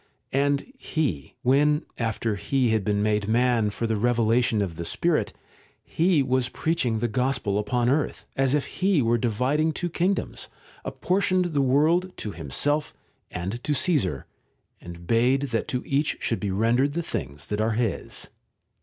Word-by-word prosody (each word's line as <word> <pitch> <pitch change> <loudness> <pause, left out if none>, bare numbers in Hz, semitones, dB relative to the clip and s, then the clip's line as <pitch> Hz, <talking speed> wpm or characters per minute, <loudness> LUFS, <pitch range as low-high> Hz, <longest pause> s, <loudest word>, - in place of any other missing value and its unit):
And 140 +1 +2 0.2
He, 95 - -2
when, 150 +4 +3
after 115 -1 -1
He 125 +5 0
had 110 -2 +1
been 105 0 0
made 105 -1 +1
man 115 -1 +2
for 110 +3 -3
the 110 -1 0
revelation 120 0 +2
of 90 -4 -5
the 85 - -5
Spirit, 160 - 0 0.5
He 165 -3 +2
was 130 -1 +1
preaching 155 -9 0
the 120 +2 0
gospel 120 -4 0
upon 120 +3 0
earth, 145 +4 0
as 135 +1 +2
if 145 - 0
He 185 -7 +1
were 115 +1 +2
dividing 130 +8 +1
two 175 +1 -3
kingdoms, 180 +4 -1 0.3
apportioned 185 -2 0
the 140 - +2
world 160 +8 +2
t<> 105 - -4
Himself 145 - -1 0.3
and 95 +7 -5
to 150 - 0
Caesar, 130 - 0 0.5
and 85 0 -10
bade 125 +7 +3
that 115 -2 -1
to 125 - -2
each 145 +2 0
should 115 - -1
be 100 - -2
rendered 115 +8 +2
the 170 +2 -2
things 70 - -5
that 105 +1 -2
are 110 +1 +1
his. 115 -1 -2
125 Hz, 160 wpm, -25 LUFS, 110-145 Hz, 0.5 s, when